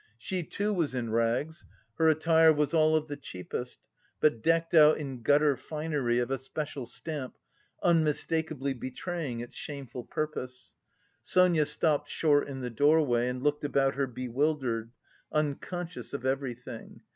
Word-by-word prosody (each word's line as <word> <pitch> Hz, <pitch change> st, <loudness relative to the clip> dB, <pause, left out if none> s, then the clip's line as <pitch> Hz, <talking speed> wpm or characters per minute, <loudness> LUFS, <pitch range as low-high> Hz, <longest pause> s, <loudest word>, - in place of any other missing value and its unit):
She, 180 Hz, +10 st, -3 dB
too, 205 Hz, +5 st, -2 dB
was 165 Hz, -8 st, 0 dB
in 120 Hz, -3 st, -2 dB
rags, 120 Hz, +8 st, 0 dB, 0.4 s
her 160 Hz, 0 st, +5 dB
attire 160 Hz, +1 st, +5 dB
was 150 Hz, 0 st, 0 dB
all 155 Hz, -1 st, +4 dB
of 155 Hz, 0 st, 0 dB
the 145 Hz, -, -4 dB
cheapest, 125 Hz, -1 st, -7 dB, 0.3 s
but 150 Hz, -7 st, +2 dB
decked 165 Hz, +4 st, +1 dB
out 155 Hz, -2 st, +7 dB
in 135 Hz, -5 st, -6 dB
gutter 145 Hz, +3 st, +4 dB
finery 150 Hz, -5 st, -2 dB
of 125 Hz, +1 st, 0 dB
a 135 Hz, -, 0 dB
special 140 Hz, -2 st, -5 dB
stamp, 140 Hz, 0 st, -5 dB, 0.5 s
unmistakably 160 Hz, -3 st, +1 dB
betraying 130 Hz, +1 st, -4 dB
its 120 Hz, -, -9 dB
shameful 135 Hz, -4 st, -6 dB
purpose. 125 Hz, -5 st, -5 dB, 0.5 s
Sonia 175 Hz, -5 st, +3 dB
stopped 150 Hz, -2 st, +1 dB
short 145 Hz, -3 st, +2 dB
in 135 Hz, -2 st, -6 dB
the 125 Hz, -1 st, -4 dB
doorway 140 Hz, -2 st, +3 dB
and 125 Hz, +1 st, -4 dB
looked 150 Hz, 0 st, +1 dB
about 135 Hz, -1 st, +2 dB
her 135 Hz, 0 st, -1 dB
bewildered, 125 Hz, -2 st, -1 dB, 0.4 s
unconscious 165 Hz, +4 st, -3 dB
of 140 Hz, -2 st, -4 dB
everything. 130 Hz, -3 st, -4 dB
145 Hz, 145 wpm, -29 LUFS, 125-155 Hz, 0.5 s, out